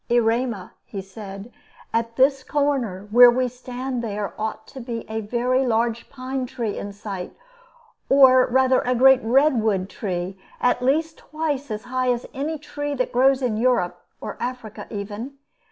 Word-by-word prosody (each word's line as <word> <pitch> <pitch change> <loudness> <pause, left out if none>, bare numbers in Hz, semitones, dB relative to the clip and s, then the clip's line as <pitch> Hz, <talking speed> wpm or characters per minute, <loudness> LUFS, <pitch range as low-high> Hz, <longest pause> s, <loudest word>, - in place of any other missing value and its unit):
"Erema," 230 -3 +1
he 200 - -7
said, 195 +3 -9 0.4
"at 230 0 -1
this 270 +1 +3
corner 255 -11 -1
where 245 +2 +9
we 250 +1 +1
stand 250 0 -5
there 210 -2 -3
ought 220 0 -4
to 270 - -11
be 235 -1 -5
a 220 0 -3
very 245 +4 0
large 235 -1 0
pine 260 -1 -4
tree 230 -4 -3
in 205 - -5
sight, 200 -3 -7 0.7
or 260 -2 +7
rather 260 +1 +3
a 250 0 0
great 265 +1 +6
redwood 225 -6 +2
tree, 185 -1 -4 0.2
at 245 - +2
least 315 +5 0
twice 300 -3 -3
as 215 -1 -4
high 255 0 0
as 240 0 -2
any 300 +4 -3
tree 290 -1 -5
that 255 -1 -1
grows 265 +2 +3
in 230 -4 0
Europe, 235 -6 +1 0.2
or - - -6
Africa 245 -4 -6
even. 210 +6 -6
245 Hz, 155 wpm, -23 LUFS, 215-260 Hz, 0.7 s, where